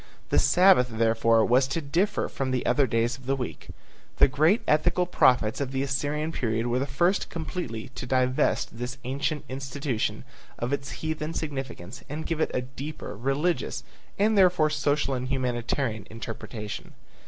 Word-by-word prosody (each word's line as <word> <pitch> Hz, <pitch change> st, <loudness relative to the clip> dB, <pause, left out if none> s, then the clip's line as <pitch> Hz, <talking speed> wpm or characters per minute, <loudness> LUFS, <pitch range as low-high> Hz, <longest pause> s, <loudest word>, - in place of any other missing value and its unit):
The -, -, +4 dB
Sabbath, 180 Hz, -8 st, +5 dB
therefore, 115 Hz, 0 st, +3 dB
was 130 Hz, +2 st, +4 dB
to 140 Hz, +5 st, -1 dB
differ 175 Hz, +8 st, 0 dB
from 135 Hz, -1 st, -3 dB
the 130 Hz, -1 st, -1 dB
other 140 Hz, -2 st, +3 dB
days 115 Hz, +4 st, 0 dB
of 130 Hz, -, -14 dB
the 135 Hz, -, +2 dB
week. 125 Hz, -2 st, -6 dB, 0.5 s
The -, -, +7 dB
great 155 Hz, -, +3 dB
ethical 155 Hz, +4 st, +3 dB
prophets 125 Hz, -9 st, +3 dB
of 135 Hz, -2 st, -2 dB
the 135 Hz, 0 st, -1 dB
Assyrian 145 Hz, +3 st, -1 dB
period 115 Hz, -6 st, -1 dB
were 120 Hz, +1 st, +1 dB
the 135 Hz, -, -1 dB
first 175 Hz, +8 st, +1 dB
completely 145 Hz, -8 st, -5 dB
to 130 Hz, -1 st, -7 dB
divest 130 Hz, -2 st, +1 dB
this 125 Hz, +2 st, -4 dB
ancient 140 Hz, +4 st, -2 dB
institution 135 Hz, -5 st, -3 dB, 0.3 s
of 120 Hz, +4 st, -2 dB
its 140 Hz, 0 st, -2 dB, 0.2 s
heathen 155 Hz, +1 st, -3 dB
significance 135 Hz, -, -5 dB
and 150 Hz, +3 st, -4 dB
give 165 Hz, -2 st, -2 dB
it -, -, +2 dB
a 125 Hz, -, -1 dB
deeper 135 Hz, 0 st, -7 dB
religious, 135 Hz, -, -1 dB, 0.3 s
and 215 Hz, +2 st, +3 dB
therefore 180 Hz, -5 st, +4 dB
social 145 Hz, -1 st, +1 dB
and 125 Hz, 0 st, -2 dB
humanitarian 125 Hz, -3 st, -1 dB
interpretation. 110 Hz, -1 st, -7 dB
135 Hz, 160 wpm, -27 LUFS, 120-150 Hz, 0.5 s, The